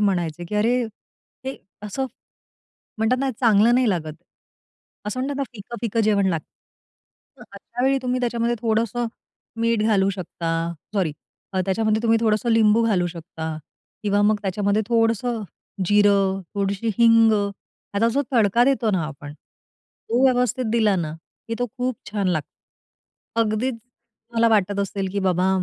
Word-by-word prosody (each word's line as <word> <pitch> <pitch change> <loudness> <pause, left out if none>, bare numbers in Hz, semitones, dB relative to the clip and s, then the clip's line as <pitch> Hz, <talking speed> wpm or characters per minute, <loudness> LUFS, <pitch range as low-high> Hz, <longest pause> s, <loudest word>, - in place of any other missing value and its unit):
म्हणायचे 175 -5 0
की 210 - -5
"अरे! 235 +4 +2 0.6
हे 265 +1 -4 0.3
असं?" 235 +6 -3 0.9
म्हणतात 225 +3 +2
ना 270 -1 +1
चांगलं 230 0 +5
नाही 255 -1 +3
लागत. 155 -4 -2 0.9
असं 255 +4 -2
म्हणतात 275 +1 -2
ना 280 - -1
फिकं-फीकं 230 +1 -3
जेवण 200 -2 +3
लागत. 165 -4 -1 1.0
तर 245 - -12
अशा 230 +5 -6
वेळी 270 0 +3
तुम्ही 250 0 -1
त्याच्यामध्ये 235 -1 0
थोडंसं 230 +1 0 0.5
मीठ 230 -2 +2
घालू 200 -3 +3
शकता. 175 -3 -4 0.4
सॉरी, 180 -7 +1 0.4
अ, 190 - 0
त्याच्यामध्ये 215 +3 +1
तुम्ही 225 -1 +3
थोडंसं 220 +1 +1
लिंबू 225 0 +4
घालू 180 -5 +2
शकता 160 -2 -6 0.5
किंवा 205 0 +2
मग 210 +1 +4
त्याच्यामध्ये 200 +2 +1
थोडंसं 230 0 +1 0.4
जिरं, 200 -1 +3
थोडीशी 200 +2 -1
हिंग, 230 -1 +6
ह्याचा 200 +1 -2
जो 285 - +2
तडका 230 0 +4
देतो 255 -5 +2
ना 180 -5 0
आपण, 145 -1 -9
तो 235 +9 -6
व्यवस्थित 250 -1 +2
दिला 215 -4 +3
ना 155 -3 -2 0.4
की 230 - -1
तो 245 - 0
खूप 250 -2 -1
छान 200 -3 0
लागतो. 155 -5 -1 0.9
अगदीच 225 +3 0
तुम्हाला 230 0 -3
वाटत 205 -2 +2
असेल 195 -1 -2
की 200 - -1
बाबा 185 0 +2
215 Hz, 145 wpm, -23 LUFS, 195-235 Hz, 1.0 s, हिंग